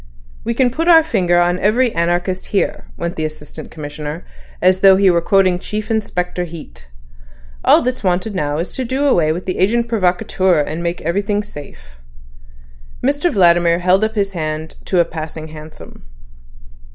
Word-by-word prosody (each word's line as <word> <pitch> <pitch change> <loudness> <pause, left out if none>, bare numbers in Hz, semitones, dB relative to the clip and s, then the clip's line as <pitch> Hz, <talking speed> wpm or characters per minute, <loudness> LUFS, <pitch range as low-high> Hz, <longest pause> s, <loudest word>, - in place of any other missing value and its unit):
"We 235 - -2
can 250 0 +2
put 325 +6 -2
our 325 -2 +7
finger 175 - +1
on 175 +1 +1
every 230 +5 +2
anarchist 175 +2 -1
here," 200 - -1
went 170 0 -3
on - - -15
the 155 - -1
Assistant 155 0 -8
Commissioner, 150 +1 -7 0.3
as 185 +1 +3
though 195 0 +7
he 195 -1 +4
were 170 -1 +2
quoting 185 -1 +2
Chief 215 +3 -5
Inspector 180 -5 -2
Heat. 160 - -11 0.8
"All - - +5
that's 250 -1 -2
wanted 185 +3 0
now 150 -5 -2
is 170 +3 -4
to 260 - -3
do 260 +4 -1
away 170 - +3
with 175 +3 -4
the 185 - -3
agent 235 +5 +2
provocateur 185 -5 +1
to 155 - -5
make 170 +1 -3
everything 205 +5 -1
safe." 65 - -12 1.1
Mr 290 +6 +1
Vladimir 170 -4 +4
held 185 +3 +2
up 220 +1 -1
his 200 -2 0
hand 155 -2 -4
to 185 - +1
a 170 - +4
passing 160 -1 -7
hansom. 155 0 -12
180 Hz, 170 wpm, -17 LUFS, 165-210 Hz, 1.1 s, our